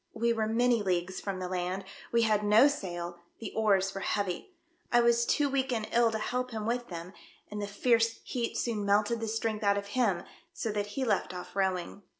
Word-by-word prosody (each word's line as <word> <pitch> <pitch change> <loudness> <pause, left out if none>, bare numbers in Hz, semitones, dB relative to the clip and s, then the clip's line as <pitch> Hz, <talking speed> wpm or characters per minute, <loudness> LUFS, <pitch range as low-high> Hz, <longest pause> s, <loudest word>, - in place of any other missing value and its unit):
We 235 +1 +2
were 220 -1 0
many 235 +1 +3
leagues 185 -1 -1
from 195 -2 -3
the 185 -1 -4
land, 185 +1 -2 0.3
we 235 0 +3
had 215 -2 +2
no 210 +6 +7
sail, 175 -10 -4 0.2
the 225 - -6
oars 195 -3 +2
were 195 - -5
heavy. 200 - -2 0.4
I 240 - +6
was 235 0 +3
too 295 -1 +3
weak 270 -1 0
and 225 -3 -1
ill 235 0 +4
to 220 - -2
help 250 +3 -2
him 220 -3 -4
with 240 +1 -1
them, 170 +1 -7 0.4
and 210 0 -4
the 205 - -2
fierce 230 +2 +2
heat 240 -3 -3
soon 225 -4 -1
melted 210 +3 +2
the 225 - -3
strength 220 0 -2
out 200 0 +3
of 200 0 -4
him, 210 -9 +1 0.3
so 230 -10 -2
that 205 -1 -2
he 265 - +1
left 200 -4 0
off 180 - -8
rowing. 190 0 -1
215 Hz, 210 wpm, -30 LUFS, 195-235 Hz, 0.4 s, no